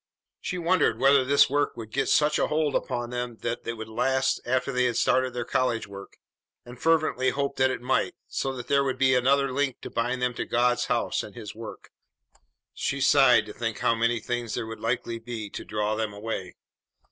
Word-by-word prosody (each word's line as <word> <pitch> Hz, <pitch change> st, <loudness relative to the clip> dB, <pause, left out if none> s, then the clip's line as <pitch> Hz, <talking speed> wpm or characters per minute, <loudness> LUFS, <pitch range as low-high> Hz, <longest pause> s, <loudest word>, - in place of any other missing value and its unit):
She 180 Hz, -, -4 dB
wondered 170 Hz, -9 st, +2 dB
whether 135 Hz, +2 st, +5 dB
this 140 Hz, +2 st, +5 dB
work 145 Hz, +1 st, 0 dB
would 110 Hz, -2 st, -8 dB
get 135 Hz, -, 0 dB
such 150 Hz, 0 st, +3 dB
a -, -, +2 dB
hold 150 Hz, -2 st, 0 dB
upon 120 Hz, -2 st, -2 dB
them 125 Hz, -1 st, -4 dB
that 120 Hz, 0 st, -3 dB
it 115 Hz, -, -1 dB
would 110 Hz, -1 st, -7 dB
last 130 Hz, +4 st, 0 dB
after 130 Hz, +2 st, 0 dB
they 125 Hz, -1 st, +2 dB
started 130 Hz, +2 st, +1 dB
their 120 Hz, -1 st, -2 dB
college 120 Hz, -3 st, 0 dB
work, 100 Hz, 0 st, -11 dB, 0.5 s
and 125 Hz, 0 st, -12 dB
fervently 155 Hz, -5 st, +2 dB
hoped 140 Hz, 0 st, -2 dB
that 130 Hz, 0 st, +4 dB
it 125 Hz, -, -4 dB
might, 130 Hz, -, 0 dB
so 135 Hz, -, -2 dB
that 125 Hz, -2 st, -7 dB
there 140 Hz, 0 st, +3 dB
would 130 Hz, -1 st, -1 dB
be 130 Hz, 0 st, +4 dB
another 135 Hz, +1 st, +2 dB
link 135 Hz, -2 st, -1 dB
to -, -, -8 dB
bind 125 Hz, +2 st, -1 dB
them 125 Hz, 0 st, 0 dB
to -, -, -4 dB
God's 120 Hz, +1 st, +1 dB
house -, -, 0 dB
and -, -, -10 dB
His -, -, -8 dB
work. -, -, -10 dB, 0.8 s
She 140 Hz, -, -2 dB
sighed 135 Hz, -3 st, +5 dB
to 105 Hz, -, -9 dB
think 115 Hz, -1 st, -3 dB
how 115 Hz, -, +2 dB
many 115 Hz, +1 st, +1 dB
things 120 Hz, -1 st, -3 dB
there 120 Hz, -, -3 dB
would 110 Hz, 0 st, -8 dB
likely 115 Hz, 0 st, -2 dB
be 115 Hz, -3 st, -6 dB
to -, -, -6 dB
draw 105 Hz, 0 st, -1 dB
them 110 Hz, -1 st, -2 dB
away. 100 Hz, -3 st, -5 dB
125 Hz, 205 wpm, -26 LUFS, 115-135 Hz, 0.8 s, whether